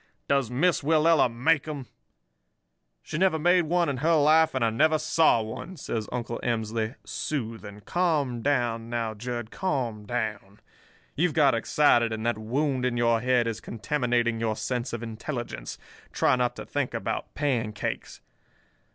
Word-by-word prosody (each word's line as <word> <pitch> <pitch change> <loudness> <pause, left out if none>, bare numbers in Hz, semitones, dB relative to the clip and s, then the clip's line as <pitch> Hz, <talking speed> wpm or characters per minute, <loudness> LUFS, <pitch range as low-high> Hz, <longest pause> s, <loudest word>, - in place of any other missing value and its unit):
Does 140 -4 +2
Miss 155 +8 +2
Willella 155 -2 +4
make 140 +6 +1
'em?' 145 -4 -5 1.2
"'She 155 - -4
never 185 -3 +3
made 175 +2 +3
one 175 +2 +1
in 140 -2 -1
her 160 +5 +2
life 155 0 +4
and 130 -3 +2
I 115 - +1
never 155 +7 +3
saw 155 -6 +3
one,' 140 +12 -7
says 110 -6 -4
Uncle 120 -1 -3
Emsley, 110 0 -2
soothing. 110 -7 -5
'Calm 150 - 0
down 120 -4 0
now, 115 -2 -2
Jud—calm 120 - -3
down. 105 -4 -4 0.6
You've 170 +2 +1
got 145 -3 +5
excited, 115 0 +3
and 110 0 -4
that 120 -2 0
wound 130 +4 -1
in 125 -1 0
your 115 -1 +2
head 125 -1 +2
is 115 -2 -3
contaminating 120 -1 -1
your 110 -1 0
sense 125 +2 -3
of 120 0 -5
intelligence. 115 - -5 0.3
Try - - +3
not 125 -1 0
to - - -7
think - - -2
about - - -4
pancakes. 120 -8 -2
125 Hz, 150 wpm, -27 LUFS, 115-150 Hz, 1.2 s, got